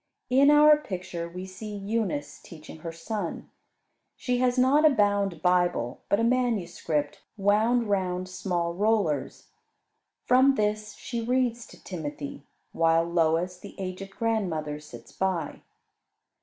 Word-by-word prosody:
In 275 Hz, +3 st, +6 dB
our 300 Hz, 0 st, +7 dB
picture 180 Hz, -, -6 dB
we 180 Hz, +2 st, -7 dB
see 205 Hz, +3 st, -8 dB
Eunice 200 Hz, -8 st, -3 dB
teaching 160 Hz, -1 st, -12 dB
her 165 Hz, +1 st, -6 dB
son. 170 Hz, +3 st, -5 dB, 0.6 s
She 250 Hz, -1 st, -1 dB
has 250 Hz, 0 st, +2 dB
not 265 Hz, +4 st, +4 dB
a 310 Hz, -, +8 dB
bound 205 Hz, -, +1 dB
Bible, 175 Hz, -9 st, +1 dB
but 200 Hz, -, +3 dB
a -, -, +1 dB
manuscript, 180 Hz, -, 0 dB, 0.2 s
wound 215 Hz, +4 st, +2 dB
round 185 Hz, -2 st, -1 dB
small 175 Hz, -2 st, -2 dB
rollers. 195 Hz, -7 st, 0 dB, 0.8 s
From 260 Hz, +2 st, +5 dB
this 210 Hz, -1 st, -1 dB
she 235 Hz, -2 st, -5 dB
reads 240 Hz, -1 st, 0 dB
to -, -, -16 dB
Timothy; 145 Hz, -5 st, -6 dB, 0.3 s
while 165 Hz, 0 st, +3 dB
Lois, 170 Hz, +1 st, 0 dB
the -, -, -11 dB
aged 190 Hz, +1 st, -5 dB
grandmother, 180 Hz, -9 st, -2 dB
sits 120 Hz, -5 st, -13 dB
by. 180 Hz, +3 st, -2 dB
190 Hz, 130 wpm, -27 LUFS, 170-230 Hz, 0.8 s, a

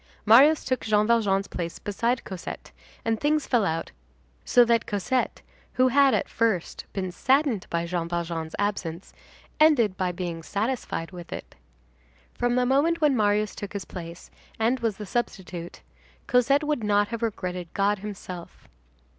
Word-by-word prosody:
Marius 275 Hz, +8 st, +6 dB
took 255 Hz, -1 st, 0 dB
Jean 210 Hz, -1 st, +2 dB
Valjean's 205 Hz, -4 st, +2 dB
place 170 Hz, -1 st, -5 dB
beside 235 Hz, +4 st, -1 dB
Cosette, 185 Hz, -3 st, -7 dB, 0.3 s
and 225 Hz, -1 st, 0 dB
things 300 Hz, 0 st, +1 dB
fell 240 Hz, -4 st, +2 dB
out 165 Hz, -3 st, -2 dB, 0.5 s
so 245 Hz, -1 st, +5 dB
that 230 Hz, -1 st, +2 dB
Cosette, 210 Hz, +5 st, -1 dB, 0.3 s
who 255 Hz, 0 st, +4 dB
had, 275 Hz, +1 st, +5 dB
at -, -, -1 dB
first, 220 Hz, -7 st, -1 dB
been 185 Hz, -2 st, -3 dB
saddened 260 Hz, -, +1 dB
by 170 Hz, 0 st, -1 dB
Jean 170 Hz, -1 st, -2 dB
Valjean's 170 Hz, -2 st, -3 dB
absence, 195 Hz, -4 st, -3 dB, 0.5 s
ended 245 Hz, -11 st, +4 dB
by 185 Hz, -1 st, 0 dB
being 175 Hz, -2 st, -5 dB
satisfied 205 Hz, -3 st, -3 dB
with 175 Hz, -2 st, -10 dB
it. -, -, -7 dB, 0.8 s
From 245 Hz, 0 st, 0 dB
the 250 Hz, 0 st, +2 dB
moment 290 Hz, +6 st, +2 dB
when 300 Hz, -4 st, +3 dB
Marius 210 Hz, -1 st, +2 dB
took 205 Hz, -1 st, -7 dB
his 200 Hz, -2 st, -4 dB
place, 170 Hz, -1 st, -9 dB, 0.3 s
and 235 Hz, +4 st, +1 dB
was 225 Hz, -4 st, -1 dB
the 210 Hz, -, -6 dB
substitute, 185 Hz, -6 st, -4 dB, 0.4 s
Cosette 270 Hz, +4 st, +3 dB
would 295 Hz, -6 st, -1 dB
not 205 Hz, 0 st, +2 dB
have 230 Hz, -1 st, -4 dB
regretted 180 Hz, -6 st, -3 dB
God 200 Hz, +1 st, +2 dB
himself. 190 Hz, -4 st, -8 dB
210 Hz, 155 wpm, -26 LUFS, 180-245 Hz, 0.8 s, Marius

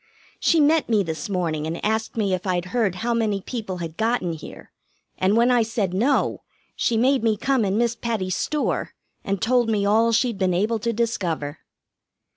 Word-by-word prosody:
She 335 Hz, -, +3 dB
met 305 Hz, 0 st, +3 dB
me 215 Hz, -3 st, +3 dB
this 160 Hz, 0 st, -5 dB
morning, 165 Hz, -5 st, -1 dB
and 165 Hz, +4 st, -4 dB
asked 220 Hz, +2 st, -1 dB
me 200 Hz, -4 st, +1 dB
if 185 Hz, +2 st, -3 dB
I'd 180 Hz, -1 st, 0 dB
heard 220 Hz, -7 st, +1 dB
how 240 Hz, -, +1 dB
many 220 Hz, -4 st, 0 dB
people 205 Hz, -2 st, -5 dB
had 165 Hz, -2 st, -6 dB
gotten 225 Hz, -6 st, 0 dB
here, 160 Hz, -, -11 dB, 0.5 s
and 195 Hz, +4 st, +3 dB
when 240 Hz, +2 st, +4 dB
I 245 Hz, -1 st, +4 dB
said 220 Hz, -5 st, -1 dB
no, 245 Hz, +9 st, +1 dB, 0.3 s
she 230 Hz, -, +1 dB
made 260 Hz, +3 st, +3 dB
me 220 Hz, -2 st, +2 dB
come 265 Hz, +1 st, +1 dB
in 200 Hz, 0 st, 0 dB
Miss 235 Hz, 0 st, +2 dB
Patty's 215 Hz, -6 st, -2 dB
store, 300 Hz, -1 st, -2 dB, 0.3 s
and 195 Hz, -1 st, -2 dB
told 240 Hz, +1 st, +2 dB
me 205 Hz, -2 st, +1 dB
all 225 Hz, +3 st, +3 dB
she'd 230 Hz, -2 st, +1 dB
been 185 Hz, -2 st, +1 dB
able 215 Hz, +5 st, +1 dB
to 235 Hz, +2 st, -1 dB
discover. 175 Hz, -10 st, -2 dB
215 Hz, 190 wpm, -23 LUFS, 185-235 Hz, 0.5 s, when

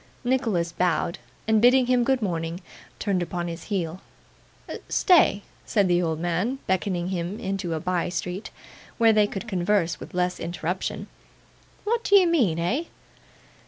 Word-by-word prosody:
Nicholas 225 Hz, -10 st, 0 dB
bowed, 170 Hz, -1 st, 0 dB, 0.3 s
and 220 Hz, -1 st, +3 dB
bidding 250 Hz, +2 st, +6 dB
him 250 Hz, -1 st, +3 dB
good 260 Hz, -1 st, +1 dB
morning, 165 Hz, -2 st, -2 dB, 0.4 s
turned 195 Hz, -4 st, 0 dB
upon 175 Hz, 0 st, -3 dB
his 165 Hz, -1 st, -6 dB
heel. 180 Hz, -3 st, -3 dB, 0.9 s
'Stay,' 320 Hz, -, +4 dB, 0.2 s
said 205 Hz, -4 st, +2 dB
the 175 Hz, 0 st, +3 dB
old 160 Hz, -2 st, -1 dB
man, 175 Hz, +10 st, -1 dB
beckoning 185 Hz, -1 st, -1 dB
him 180 Hz, +2 st, -3 dB
into 190 Hz, -3 st, -2 dB
a -, -, -2 dB
bye 180 Hz, 0 st, -1 dB
street, 180 Hz, +3 st, -4 dB, 0.5 s
where 225 Hz, -2 st, +5 dB
they 210 Hz, -1 st, +4 dB
could 205 Hz, +3 st, -6 dB
converse 180 Hz, -4 st, 0 dB
with -, -, -10 dB
less 180 Hz, 0 st, 0 dB
interruption. 175 Hz, +1 st, -3 dB, 0.8 s
'What 465 Hz, +2 st, 0 dB
d'ye 400 Hz, -2 st, +6 dB
mean, 255 Hz, -, +2 dB
eh? 230 Hz, -, 0 dB
185 Hz, 145 wpm, -25 LUFS, 175-225 Hz, 0.9 s, bidding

